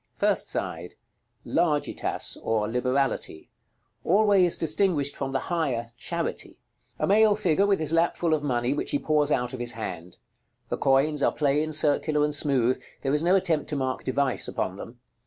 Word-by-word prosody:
First - - 0
side. - - -4 0.5
Largitas, 155 -4 -1
or 110 -2 0
Liberality: 125 - -1 0.5
always 195 -2 +3
distinguished 155 -3 0
from 135 -1 -4
the 135 - -1
higher 130 -9 -1
Charity. 120 - -5 0.4
A - - 0
male 210 +1 +4
figure, 195 -1 +2
with 200 -1 +2
his 155 0 -2
lap 165 +1 +2
full 170 -2 +1
of 155 - +1
money, 125 -2 0
which 145 - -3
he 290 - +1
pours 150 - +1
out 125 -2 0
of 130 - -6
his 120 0 -3
hand. 90 -6 -7 0.5
The - - -2
coins 140 +2 +2
are - - +3
plain, 150 +1 0
circular, 150 0 +2
and 150 0 0
smooth; 135 -4 +1 0.2
there 135 0 0
is 150 - +2
no 175 +3 +3
attempt 165 -6 0
to 150 - -2
mark 130 -2 -2
device 130 0 -1
upon 95 +1 -3
them. 120 +4 -10
145 Hz, 170 wpm, -26 LUFS, 130-165 Hz, 0.5 s, male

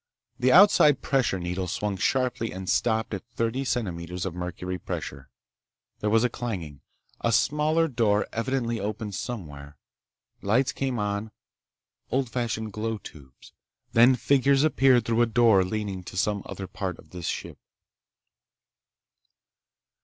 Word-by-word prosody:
The 130 0 +3
outside 150 -6 +6
pressure 130 -8 +1
needle 90 +1 -3
swung 100 +3 -2
sharply 125 +2 0
and 95 0 -7
stopped 110 +1 +1
at 95 - -4
thirty 120 +2 -2
centimeters 90 -8 -3
of 95 - -3
mercury 90 +1 -5
pressure. 70 -4 -6 0.7
There 105 - -1
was 115 +2 +3
a - - +4
clanging. 90 - -5 0.4
A 115 - 0
smaller 155 +6 +2
door 110 -6 +1
evidently 115 -1 -1
opened 105 +1 -4
somewhere. 75 - -7 0.6
Lights 115 +7 +2
came 130 -3 -2
on—old 110 +4 -5
fashioned 110 -3 -3
glow 110 +1 -2
tubes. 70 -9 -14 0.4
Then 120 +3 +6
figures 140 +1 +3
appeared 130 -6 +4
through 115 0 +1
a 120 - +4
door 115 -4 +4
leading 100 -1 -4
to 90 - -8
some 105 +1 0
other 95 - -6
part 95 -1 -5
of - - -18
this 90 -3 -6
ship. - - -5
110 Hz, 130 wpm, -26 LUFS, 95-125 Hz, 0.7 s, outside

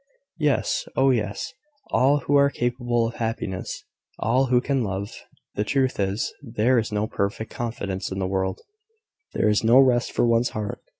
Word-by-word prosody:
"Yes, 150 -3 +1
oh, 135 0 +4
yes! 105 -5 -2 0.4
all 140 +3 +3
who 145 - +1
are 140 0 +5
capable 120 -2 0
of 115 - -6
happiness: 110 -5 -4 0.3
all 130 +4 +2
who 125 0 +4
can 135 0 0
love. 100 0 -4 0.4
The 105 - -1
truth 130 +2 0
is, 100 +2 -1
there 120 -1 +2
is 110 - -3
no 105 0 0
perfect 110 0 -3
confidence 110 -7 -4
in 95 - -4
the 95 - -1
world: 95 0 -1 0.7
there - - +2
is 105 0 +2
no 115 +3 +6
rest 125 -3 +4
for - - +1
one's 115 +1 +3
heart. 105 -1 -4
115 Hz, 170 wpm, -24 LUFS, 105-130 Hz, 0.7 s, no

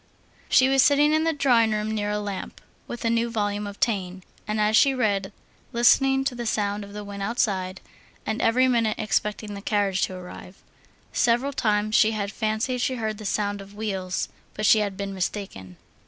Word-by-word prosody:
She 260 - +5
was 270 0 +4
sitting 290 +2 +4
in 315 +1 +2
the 325 - +3
drawing 245 -7 +3
room 215 0 -2
near 205 -1 -2
a 210 - -1
lamp, 205 -2 -6 0.3
with 240 -1 -6
a - - +3
new 230 0 +1
volume 205 -2 -2
of 200 0 -9
Taine, 190 -5 -1 0.2
and 215 0 -1
as 210 +1 +2
she 270 +3 +5
read, 200 -5 0 0.4
listening 270 +3 +4
to 270 - -1
the 240 -1 -5
sound 205 -1 -1
of 200 - -11
the 210 0 -6
wind 200 -1 -7
outside, 195 -4 -1 0.4
and 220 +1 -2
every 255 +3 +3
minute 230 -4 +1
expecting 210 0 -2
the 200 - -7
carriage 200 -2 0
to 185 - -8
arrive. 180 +1 -11 0.5
Several 245 +4 +2
times 215 -3 0
she 220 0 +4
had 200 -2 -3
fancied 220 +4 -1
she 260 - 0
heard 220 -3 -3
the 215 - -8
sound 205 0 -1
of 200 +1 -13
wheels, 195 -4 -3 0.3
but 215 - -2
she 220 - +6
had 200 -2 -2
been 200 -1 -4
mistaken. 180 - -5
215 Hz, 195 wpm, -25 LUFS, 200-235 Hz, 0.5 s, she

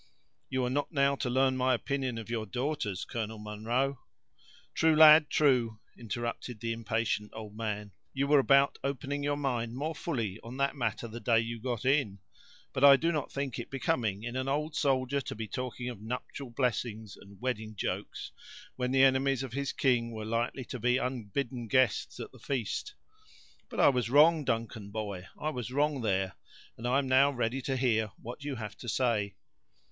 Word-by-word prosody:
"You 130 -1 0
are - - 0
not 145 +2 -1
now 140 -2 +3
to 130 - -2
learn 130 +1 +3
my 130 0 +3
opinion 130 -1 -2
of 115 - -6
your 115 -2 -3
daughters, 120 -5 -2
Colonel 110 -2 -4
Munro." 115 +6 -1 0.7
"True, 160 -1 +4
lad, 155 -1 +9
true," 125 -7 +2 0.2
interrupted 120 0 -5
the 115 +1 -2
impatient 115 -2 -1
old 105 -2 -8
man; 105 -2 -3 0.2
"you 140 +1 0
were 145 0 +5
about 140 +1 +4
opening 140 +1 -2
your 145 0 0
mind 120 -5 -2
more 155 +5 -2
fully 115 - -3
on 120 +3 -8
that 140 +1 +1
matter 120 -3 -2
the 115 +1 -7
day 115 -1 +3
you 115 0 -3
got 125 -1 -3
in, 135 -7 +2 0.6
but 130 - -1
I 140 -1 +10
did 165 +4 +1
not 150 -3 -2
think 140 -4 -3
it 120 - -6
becoming 110 -6 -1
in 120 +1 -4
an 130 +1 -2
old 150 +3 -1
soldier 135 -1 +1
to - - -6
be 110 0 -5
talking 125 +1 -4
of 120 -5 -6
nuptial 125 +3 -5
blessings 115 -3 -2
and 100 -1 -15
wedding 110 -3 -3
jokes - - -4 0.4
when 125 -1 -1
the 135 +1 +4
enemies 135 0 +3
of 130 -3 -6
his 140 0 -1
king 120 -3 +2
were 110 -2 -6
likely 115 +3 -1
to 125 - -6
be 125 +3 +3
unbidden 125 -1 -3
guests 130 -1 +2
at - - -6
the - - -16
feast. 140 - -3 0.7
But - - -6
I - - +7
was 125 -4 0
wrong, 150 +3 +6
Duncan, 115 -3 -2
boy, 100 -4 -5
I 155 - -1
was 125 -4 -4
wrong 145 +1 +1
there; 95 -3 0 0.4
and 115 - -5
I 125 +2 +3
am 140 -1 0
now 130 +2 +5
ready 125 -1 -1
to 130 +1 -1
hear 115 -4 +2
what 125 +5 -8
you 145 -2 -3
have 110 -3 -6
to 120 - -6
say." 110 -5 0
125 Hz, 190 wpm, -30 LUFS, 115-135 Hz, 0.7 s, I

